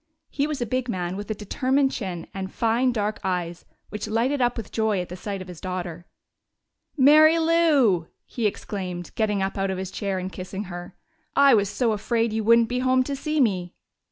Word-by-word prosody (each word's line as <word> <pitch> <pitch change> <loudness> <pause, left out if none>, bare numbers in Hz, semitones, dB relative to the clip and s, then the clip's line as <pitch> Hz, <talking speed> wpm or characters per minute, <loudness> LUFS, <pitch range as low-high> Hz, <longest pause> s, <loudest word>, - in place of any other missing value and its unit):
He 285 +1 0
was 300 -2 -3
a - - -3
big 255 +2 -2
man 180 -3 -2
with 205 +2 -6
a 215 - -1
determined 265 +6 +1
chin 180 -7 -5
and 190 -1 -5
fine 235 +3 +1
dark 210 -2 -2
eyes 175 -2 -3 0.2
which 210 0 -5
lighted 245 +6 0
up 245 0 +1
with 225 - -6
joy 220 -3 +1
at 180 - -4
the 180 - -6
sight 195 0 -5
of - - -15
his 180 -3 -10
daughter. 175 -2 -5 0.9
"Mary 310 +4 +7
Lou!" 305 - +3 0.2
he 230 -3 -1
exclaimed, 180 -4 -5
getting 210 -3 0
up 195 +1 -3
out 195 0 0
of 190 - -2
his 190 0 -5
chair 195 -3 -2
and 185 +1 -4
kissing 190 +2 -5
her. 175 -1 -8 0.4
"I 280 -1 +6
was 200 -3 +3
so 230 +2 0
afraid 225 +1 0
you 220 0 -1
wouldn't 230 +1 +5
be 250 +1 -2
home 255 0 +3
to 280 +2 -3
see 305 +2 -2
me!" 185 -8 +1
210 Hz, 205 wpm, -24 LUFS, 185-255 Hz, 0.9 s, Mary